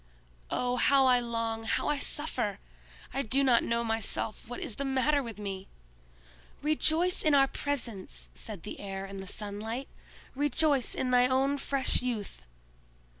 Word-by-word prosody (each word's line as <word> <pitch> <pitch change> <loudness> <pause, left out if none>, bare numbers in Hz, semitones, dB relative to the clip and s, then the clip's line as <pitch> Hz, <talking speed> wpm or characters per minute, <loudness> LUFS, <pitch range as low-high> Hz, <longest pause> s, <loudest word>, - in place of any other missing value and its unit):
Oh, 250 0 0
how 275 +1 +5
I 250 -1 +5
long, 230 -1 -2
how 225 - 0
I 295 -1 +1
suffer! 255 -10 -1 0.6
I 270 - 0
do 275 +2 +2
not 245 -3 +5
know 235 0 0
myself 225 -1 -2
what 245 - -6
is 320 - -2
the 280 - -1
matter 275 +2 +2
with 230 -5 -7
me!" 195 -2 -5 1.0
"Rejoice 315 +4 +2
in 305 -2 +4
our 275 -1 +7
presence!" 230 - -3
said - - -8
the - - -7
Air 195 -1 -5
and 195 0 -7
the 190 - -7
Sunlight; 215 +6 -5 0.5
"rejoice 290 -1 +2
in 255 - -1
thy 250 0 +5
own 270 +2 +2
fresh 270 -1 +1
youth!" 210 - -4
250 Hz, 155 wpm, -30 LUFS, 215-275 Hz, 1.0 s, our